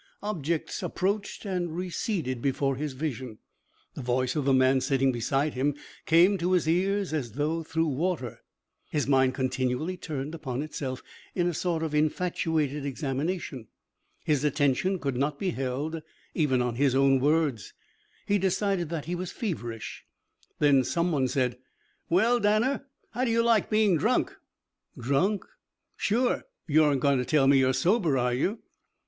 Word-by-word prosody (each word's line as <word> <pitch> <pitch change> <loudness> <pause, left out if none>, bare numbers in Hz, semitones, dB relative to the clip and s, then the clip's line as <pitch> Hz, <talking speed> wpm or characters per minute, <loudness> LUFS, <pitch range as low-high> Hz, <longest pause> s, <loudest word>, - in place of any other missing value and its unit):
Objects 170 -6 -2
approached 200 +3 -2
and 175 -4 -2
receded 175 - -2
before 135 0 0
his 145 +1 -4
vision. 130 -5 -4 0.6
The - - -7
voice 125 0 0
of 150 -3 -1
the 140 - +3
man 130 0 +4
sitting 135 0 +2
beside 135 +5 0
him 140 +3 0 0.3
came 180 +5 +5
to 180 +2 +1
his 175 -4 +2
ears 190 +2 +1
as 125 -8 -2
if 160 +2 -1
through 160 0 0
water. 150 -4 -2 0.5
His 150 - 0
mind 130 -2 +3
continually 130 +6 -1
turned 150 -3 -5
upon 140 -4 -4
itself 135 -4 -5 0.3
in 175 - +1
a 175 - 0
sort 165 0 -1
of 160 -2 -3
infatuated 155 -2 0
examination. 140 -1 -3 0.6
His 150 -2 +1
attention 150 +6 +1
could 140 -6 -3
not 140 +2 0
be 190 +2 -1
held 140 +4 -3 0.3
even 130 -6 +2
on 120 -1 -2
his 135 -1 +2
own 135 0 +4
words. 145 -5 0 0.5
He 205 0 +2
decided 190 -2 0
that 160 -4 -4
he 175 - -3
was 180 0 -4
feverish. 120 - -5 0.5
Then 140 -3 +4
some 170 +7 0
one 135 -4 +1
said: 125 -1 -1 0.5
"Well, 225 +8 +3
Danner, 235 +7 +1 0.2
how 245 +3 -2
do 255 - +1
you 230 0 +3
like 230 -2 +3
being 215 -5 +3
drunk?" - - +1 0.6
"Drunk?" 140 - 0 0.5
"Sure. 245 +4 0 0.2
You 155 -1 +4
aren't 140 -3 +2
going 140 -1 +3
to 125 - -1
tell 150 -1 +3
me 135 0 +5
you're 130 0 +3
sober, 165 - +2
are 125 0 +1
you?" 195 - -1
150 Hz, 155 wpm, -27 LUFS, 130-180 Hz, 0.6 s, came